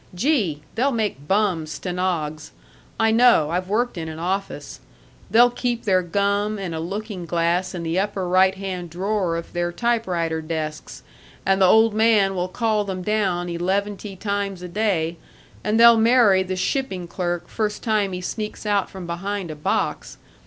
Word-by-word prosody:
Gee! 190 - 0
they'll 265 +5 +1
make 210 - -2
bum 190 -6 +1
stenogs. 165 -3 -3 0.5
I 225 0 +4
know. 225 -10 +5
I've 180 +1 -1
worked 225 -2 0
in 160 -1 -5
an 160 - -7
office. 190 +4 -4 0.5
They'll 240 +2 +6
keep 245 -1 -2
their 185 -3 +3
gum 200 +4 0
and 190 -4 -4
a 160 - -3
looking 195 +1 -5
glass 170 +2 0
in 170 - -4
the 165 +2 0
upper 195 -2 -2
right 185 +1 +4
hand 185 -3 -5
drawer 185 0 -1
of 170 - -8
their 175 0 -1
typewriter 175 -7 -1
desks, 155 -1 -5 0.4
and 195 0 +2
the 190 - +7
old 220 +3 +5
man 215 -3 +3
will 180 -1 -1
call 215 +2 0
them 190 -2 -5
down 190 -4 0
eleventy 195 +3 -2
times 200 -2 -3
a - - -5
day, 175 -4 -1 0.5
and 215 +2 +1
they'll 235 0 +8
marry 225 -4 +5
the 185 0 -3
shipping 185 - -2
clerk 175 -1 -3
first 210 -2 -3
time 215 -4 +1
he 180 - -4
sneaks 215 +4 -5
out 205 -2 +1
from 190 -2 -8
behind 180 +1 -4
a - - -6
box. 150 - -2
190 Hz, 165 wpm, -22 LUFS, 175-215 Hz, 0.5 s, they'll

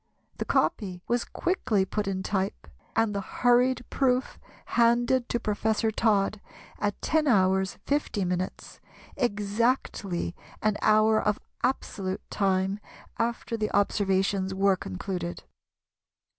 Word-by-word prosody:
The - - -1
"copy" 180 -4 0
was 240 0 +1
quickly 225 - 0
put 210 +2 -2
in 190 -1 -2
type, 195 -1 -2 0.3
and 225 -1 +2
the 200 - -1
hurried 245 +4 +2
proof 255 -1 +1 0.3
handed 240 +1 +3
to 240 - 0
Professor 220 +1 0
Todd 210 -2 +1 0.4
at 205 -1 -1
10h. 190 -11 +2
50m., 185 -10 -2 0.4
exactly 210 -4 0 0.2
an 215 -1 +1
hour 215 0 +4
of 210 0 +1 0.3
absolute 195 -7 -2
time 195 0 +1 0.4
after 230 0 -1
the 215 -1 -1
observations 195 -1 +1
were 195 0 +4
concluded. 175 - -5
210 Hz, 105 wpm, -27 LUFS, 190-235 Hz, 0.4 s, hour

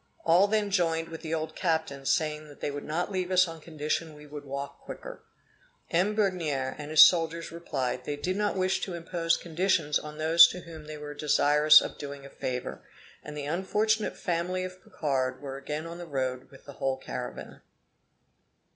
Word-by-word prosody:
All 175 +4 +5
then 210 -1 0
joined 165 -3 +1
with 165 -1 -8
the 165 -1 -2
old 155 0 -4
captain 160 -6 -1
saying 150 -2 -1
they - - -2
would 145 0 -6
not 165 +6 -2
leave 185 -2 -2
us 185 -1 +4
on 165 -1 -9
condition 155 0 -3
we 150 0 -13
would 145 0 -9
walk 140 +1 -6
quicker. - - -9 0.7
M. 185 +5 +2
Begnere 165 -10 0
and 150 0 -6
his 155 -1 +10
soldiers 165 -1 +1
replied, 135 -7 -3
they 145 - -3
did 180 +6 -2
not 205 0 0
wish 185 0 +1
to 185 - -3
impose 165 0 0
conditions 170 -3 +1
on 150 0 -9
those 165 +2 +8
to 180 - -6
whom 160 -3 -11
they 155 0 -7
were 150 0 -7
desirous 150 +1 +6
of - - -6
doing 140 -1 -7
a 140 - -11
favor; 125 -1 -4 0.4
and 150 0 -8
the 145 - -4
unfortunate 210 +7 0
family 180 +1 -1
of 185 0 -8
Picard 130 -4 -1
were 135 -2 -6
again 150 +3 -5
on 170 +1 -7
the 175 - -7
road 130 -3 -3
with 135 - -17
the 140 - -10
whole 135 -1 -1
caravan. - - -7
160 Hz, 185 wpm, -28 LUFS, 145-175 Hz, 0.7 s, his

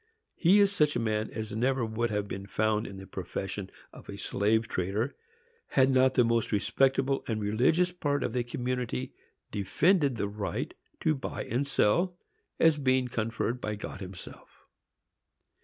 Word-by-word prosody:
He 190 +4 +5
is 200 -1 +5
such 150 -7 +2
a - - +1
man 110 -1 -1
as 110 -1 -5
never 125 +1 +1
would 115 +1 -1
have 105 -1 -1
been 100 0 -6
found 110 +1 0
in 95 - -8
the 95 - -9
profession 95 +1 -5 0.2
of - - -13
a - - -6
slave 110 +2 +1
trader, 105 +5 -1 0.5
had 135 0 +3
not 130 0 +4
the 125 - +6
most 115 -1 +1
respectable 135 +5 +2
and 110 -2 -1
religious 125 +13 +2
part 145 -5 -1
of - - -2
the 125 -1 0
community 125 - -3 0.4
defended 140 - +2
the 100 - -1
right 100 0 -4 0.3
to 155 - +3
buy 135 - -4
and 135 +4 -1
sell, 175 - +2 0.4
as 160 -2 +5
being 130 -2 +2
conferred 115 +2 -2
by 105 0 -2
God 100 - -7
himself. 95 -1 -11
120 Hz, 160 wpm, -29 LUFS, 105-135 Hz, 0.5 s, the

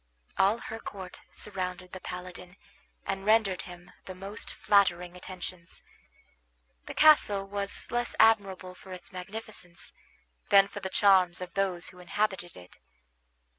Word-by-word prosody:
All 200 +4 +4
her 225 -1 -7
court 190 -4 -8
surrounded 185 -2 -4
the 185 - -7
paladin, 180 0 -8 0.5
and 195 0 -2
rendered 210 -3 +3
him 175 0 -11
the 185 - -7
most 195 +3 -5
flattering 180 -4 +2
attentions. 180 -1 -9 1.0
The - - -6
castle 210 -11 +5
was 200 0 -4
less 240 0 -1
admirable 195 -4 +4
for 185 +1 -14
its 180 0 -8
magnificence 180 -2 -7 0.6
than 195 0 +7
for 205 - -7
the 190 - -4
charms 190 -3 +5
of 180 -1 -7
those 190 -3 +1
who 180 - -15
inhabited 180 -1 -2
it. 90 0 -14
190 Hz, 130 wpm, -29 LUFS, 180-200 Hz, 1.0 s, than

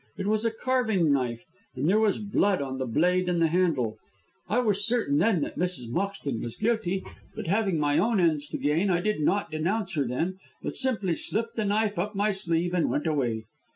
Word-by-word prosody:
It 195 - -3
was 215 +1 +1
a - - +4
carving 220 - +1
knife, 120 -4 -1 0.3
and 145 - -1
there 205 +5 +4
was 215 -3 +2
blood 200 -2 +1
on 135 -1 -4
the 130 - -2
blade 180 +8 +2
and 175 -1 +1
the 165 -1 +3
handle. 155 -11 +1 0.5
I 215 - +1
was 210 -5 +2
certain 215 -11 +1
then 200 -7 +3
that - - -4
Mrs. 175 -10 -2
Moxton 170 - -2
was 120 - -5
guilty, 210 -4 0 0.3
but - - -5
having 195 0 +1
my 145 -1 +2
own 225 -2 +2
ends 155 -4 +2
to - - -4
gain 160 +7 +1
I 175 -2 +2
did 210 +1 -1
not 185 +3 +1
denounce 180 +8 -1
her 145 -5 0
then, 170 +10 -2 0.2
but - - -4
simply 215 -9 +1
slipped 230 +7 -2
the 220 - -1
knife 205 -1 +1
up 210 +4 -2
my 205 +2 +2
sleeve 175 -2 0
and 175 -3 +2
went 145 - -1
away. 120 -8 0
180 Hz, 210 wpm, -27 LUFS, 150-210 Hz, 0.5 s, a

